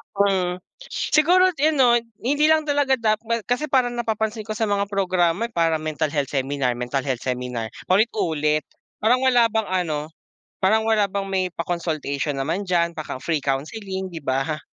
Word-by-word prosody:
Mm, 185 -3 +1 0.5
siguro 365 +4 +5
yun, 310 +1 +3
'no, 250 -3 +5 0.3
hindi 290 +4 +2
lang 315 0 +4
talaga 285 -2 +2 0.5
kasi 270 +5 0
parang 250 -3 +1
napapansin 220 -1 -2
ko 215 - -3
sa 225 - -1
mga 200 0 0
programa 185 0 +1
para 165 -4 +2
mental 155 0 -1
health 145 -3 -1
seminar, 135 -2 0
mental 125 +2 -2
health 130 -3 -2
seminar, 125 -3 -3 0.2
paulit-ulit, 160 -7 +1 0.4
parang 245 +3 +4
wala 245 -3 +5
bang 220 -1 0
ano, 160 -5 -1 0.5
parang 220 +4 +3
wala 215 -2 +3
bang 195 0 -3
may 190 -1 +1
pa-consultation 155 -4 -2
naman 165 +9 -2
diyan, 170 -2 +2
paka 150 -4 -6
free 165 -2 0
counseling, 190 +7 -3
di 165 - -6
ba? 135 +3 -1
185 Hz, 155 wpm, -23 LUFS, 150-225 Hz, 0.5 s, siguro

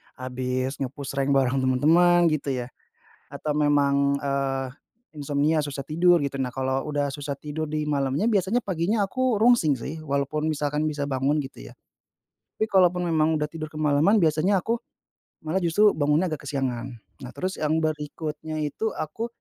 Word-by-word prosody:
habis 130 +1 -3
nge-push 140 +1 -4
rank 135 0 +2
bareng 135 0 +2
temen-temen 165 +7 +4
gitu 145 -2 -2
ya, - - -9 0.6
atau 150 - -3
memang, 140 -1 +2
eee, 135 -1 -1 0.5
insomnia 145 +2 +1
susah 145 -2 -4
tidur 175 +4 +4
gitu, 140 0 -3
nah 130 - 0
kalau 130 0 -1
udah 145 -1 -1
susah 145 -1 -4
tidur 150 +2 -5
di 155 0 -2
malamnya 140 +4 0
biasanya 205 +4 +1
paginya 190 +4 0
aku 255 +3 0
rungsing 230 - +5
sih, 145 +7 -6
walaupun 140 +1 -2
misalkan 150 0 -1
bisa 145 -1 -3
bangun 140 +2 0
gitu - - -10
ya. - - -14 0.8
Tapi 220 0 -1
kalaupun 180 -2 +4
memang 160 0 +2
udah 150 - -1
tidur 155 -1 -5
kemalaman 155 +5 +2
biasanya 170 +5 +2
aku 230 +1 0 0.7
malah 160 +4 -1
justru 190 +5 +4
bangunnya 150 +4 +2
agak 145 -2 -5
kesiangan. 130 -2 -3 0.3
Nah 125 - -8
terus 185 +1 -3
yang 155 0 +1
berikutnya 155 0 -4
itu 220 +10 -2
aku, 220 +10 -4
150 Hz, 160 wpm, -25 LUFS, 140-165 Hz, 0.8 s, rungsing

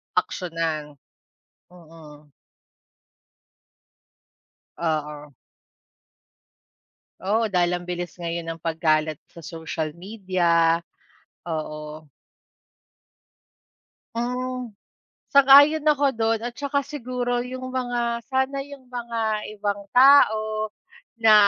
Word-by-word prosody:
Aksiyunan, 160 -4 -2 0.7
mm. 155 -4 -15 2.5
Oo. 150 -3 -3 1.9
Oo, 215 +3 +1
dahil 180 -2 +2
ang 175 - -2
bilis 175 0 -5
ngayon 170 0 -3
ng 165 0 -6
pagkalat 155 -2 +1
sa 170 - -14
social 160 -1 -4
media, 175 -4 +1 0.7
oo. 155 -1 -6 2.1
Hmm, 250 0 -3 0.6
sang-ayon 280 +3 +7
ako 290 -1 +3
do'n. 225 -1 +1
At 240 - -6
'tsaka 280 +1 -1
siguro 250 -3 -2
yung 255 +1 -6
mga, 240 -2 -1
sana 265 +1 0
yung 280 -2 -12
mga 230 -3 -2 0.2
ibang 205 0 -2
tao 215 -5 +5 0.5
na 225 -2 +6
210 Hz, 80 wpm, -24 LUFS, 165-250 Hz, 2.5 s, sang-ayon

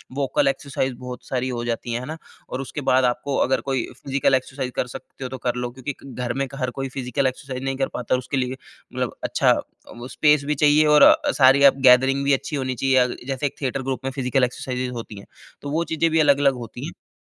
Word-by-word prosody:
Vocal 135 -1 +1
exercise 135 -1 -1
बहुत 125 0 -8
सारी 130 -1 -1
हो 120 -1 -3
जाती 120 0 -3
है, 120 - -1
है 125 - -7
ना? 155 +3 -6 0.3
और 130 - -4
उसके 145 +2 -6
बाद 130 +1 +4
आपको 125 +3 -1
अगर 130 - 0
कोई 135 -2 -1 0.2
फिज़िकल 135 -1 +2
एक्सरसाइज़ 130 0 -3
कर 125 - -1
सकते 130 - -10
हो 130 - -4
तो 130 - -6
कर 120 - +1
लो। 125 0 -3
क्योंकि 140 +3 -4
घर 125 -2 -4
में 135 0 -2
हर 130 -2 -2
कोई 135 +1 -4
फिज़िकल 130 0 -1
एक्सरसाइज़ 130 0 -5
नहीं 135 0 -2
कर 135 -1 0
पाता 125 +1 -1
और 125 - -1
उसके 135 +2 -4
लिए 125 0 -1 0.4
मतलब - - -3
अच्छा - - +2 0.5
वो 120 +1 -7
स्पेस 150 0 +3
भी 150 - 0
चाहिए 150 +2 +4
और 150 0 +6
अ, - - +6
सारी 135 +1 +5
अप 140 -1 +7
गैदरिंग 135 +2 +4
भी 140 - +4
अच्छी 140 +3 -2
होनी 130 -2 -2
चाहिए। 135 +2 +1
अ, 125 0 +5 0.2
जैसे 135 +1 -2
एक 140 - -2
थिएटर 135 0 -2
ग्रुप 135 -1 -3
में 135 - -1
फिज़िकल 130 -1 0
एक्सरसाइज़ेस 125 0 -2
होती 115 -4 -7
हैं - - -13 0.4
तो 145 - -6
वो 165 +2 +1
चीज़ें 165 +1 +2
भी 160 - +3
अलग-अलग 140 -2 +4
होती - - -8
हैं। - - -12
130 Hz, 235 wpm, -23 LUFS, 125-140 Hz, 0.5 s, अप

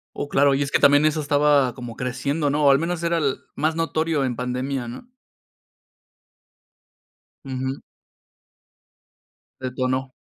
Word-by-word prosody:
Oh, 145 - -4
claro, 140 0 +3
y 140 - 0
es 140 - -2
que - - +3
también 145 +2 +5
eso 155 0 0
estaba 145 -3 +3
como 120 -3 -8
creciendo, 140 +4 -1
¿no? 145 0 +1
O - - +7
al 135 - +5
menos 170 +1 -2
era 170 0 +1
el 140 -5 0 0.2
más 160 +1 0
notorio 160 -3 0
en 125 -2 -2
pandemia, 125 +1 -3
¿no? 130 - -10 2.3
Ujú. 130 0 -4 1.8
Detonó. 130 0 -2
140 Hz, 135 wpm, -23 LUFS, 130-150 Hz, 2.3 s, O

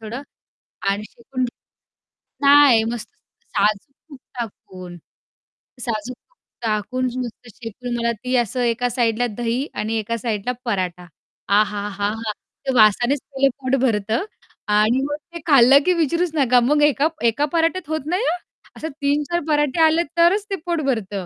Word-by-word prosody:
थोडं 225 +5 -6 0.7
आणि 200 +1 -2
शेकून 255 +2 -4 1.0
नाही, 280 -5 +7
मस्त 230 0 -4 0.4
साजूक 210 +3 0 0.2
तूप 280 -3 -12 0.2
टाकून. 185 -5 -8 0.8
साजूक 235 +1 -3
तूप - - -41 0.3
टाकून 225 +4 -1
नुसतं 245 -1 -6
शेकून 240 +1 -6
मला 235 0 0
ती 255 0 -1
असं 245 +1 0
एका 240 +1 +1
साइडला 240 -1 +1
दही 240 +4 -1
आणि 220 +1 -2
एका 230 +2 -3
साइडला 225 0 -2
पराठा 185 -5 -2 0.5
आहाहाहा! 205 -1 -1 0.5
ते 265 - 0
वासानेच 240 +5 +4
पहिलं 270 0 +3
पोट 260 0 +1
भरतं 225 - 0 0.5
आणि 215 +5 +3
मग 290 +1 -2 0.2
ते 340 - -5
खाल्लं 275 -2 +7
की 365 - +4
विचारूच 335 +1 0
नका 255 -4 +4
मग 295 +4 +2
एका 295 0 +3 0.2
एका 230 +6 +1
पराठ्यात 330 0 0
होत 315 -3 -2
नाही 360 +9 0
हां, 355 - 0 0.4
असं 320 - -4
3-4 295 +4 0
पराठे 295 +1 +1
आले 320 +2 +3
तरच 365 +5 +4
ते 395 - -1
पोट 340 -2 -1
भरतं. 205 -8 -2
245 Hz, 145 wpm, -21 LUFS, 220-290 Hz, 1.0 s, नाही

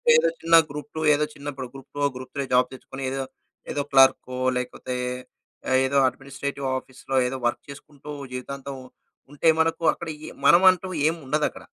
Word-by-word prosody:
ఏదో 485 +1 +4
చిన్న 165 0 +4
గ్రూప్-2 150 +2 -6
ఏదో 150 +1 +2
చిన్న 145 +1 -10
ఇప్పుడు 130 -1 -6
గ్రూప్-2, 140 +1 -4
గ్రూప్-3 135 +2 -5
జాబ్ 125 0 +4
తెచ్చుకొని, 135 +1 -9
ఏదో 135 0 -2 0.5
ఏదో 145 - -1
క్లర్కో 135 -1 +4 0.2
లేకపోతే 125 0 -4 0.9
ఏదో 140 +1 +1
అడ్మినిస్ట్రేటివ్ 140 +1 -5
ఆఫీస్‌లో 130 +1 -7
ఏదో 130 +1 -3
వర్క్ 120 - -3
చేసుకుంటూ 145 +1 -12 0.2
జీవితాంతం 135 +2 -6 0.6
ఉంటే, 145 +3 -1
మనకు 165 +1 +1
అక్కడ 170 - -8 0.2
ఈ - - -7 0.2
మనం 175 +2 +7
అంటూ 185 +1 -5 0.2
ఏం 165 - -3
ఉండదక్కడ. 150 +2 -1
140 Hz, 150 wpm, -25 LUFS, 130-150 Hz, 0.9 s, మనం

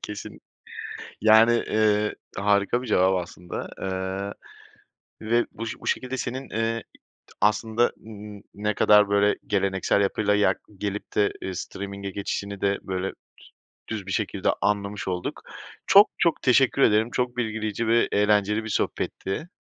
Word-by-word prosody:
Kesin, 105 -1 -7 0.8
yani, 110 +2 +6
eee, 105 -2 +1 0.2
harika 100 +4 +2
bir 130 - -7
cevap 95 -3 +3
aslında, 90 0 -7
eee, 95 +1 -3 1.0
ve 120 +1 +3
buş 115 +1 -5
bu - - -9
şekilde 130 +1 -1
senin, 130 +2 -4
eee, 115 +1 -1 0.6
aslında 110 +2 +2
n 105 -1 -10
n - - -18
ne 105 0 -1
kadar 105 -1 +5
böyle 100 0 +3
geleneksel 95 -1 +1
yapıyla 105 +1 +1
yak 105 0 +2 0.2
gelip 105 0 -4
de, 105 -1 +3
eee 95 - -4
streaming'e 100 +2 -6
geçişini 100 0 -4
de 100 0 +1
böyle 95 0 -3 0.8
düz 110 -4 -4
bir 95 - -4
şekilde - - -1
anlamış 100 0 -1
olduk. 90 -1 -3 0.5
Çok, 200 +2 +8
çok 170 - +1
teşekkür 135 +1 +3
ederim. 110 -1 +4
Çok 125 -1 -1
bilgileyici 110 -1 -2
ve 115 +1 +3
eğlenceli 105 +1 +2
bir 110 - -6
sohbetti. 105 - -2
105 Hz, 140 wpm, -25 LUFS, 100-115 Hz, 1.0 s, Çok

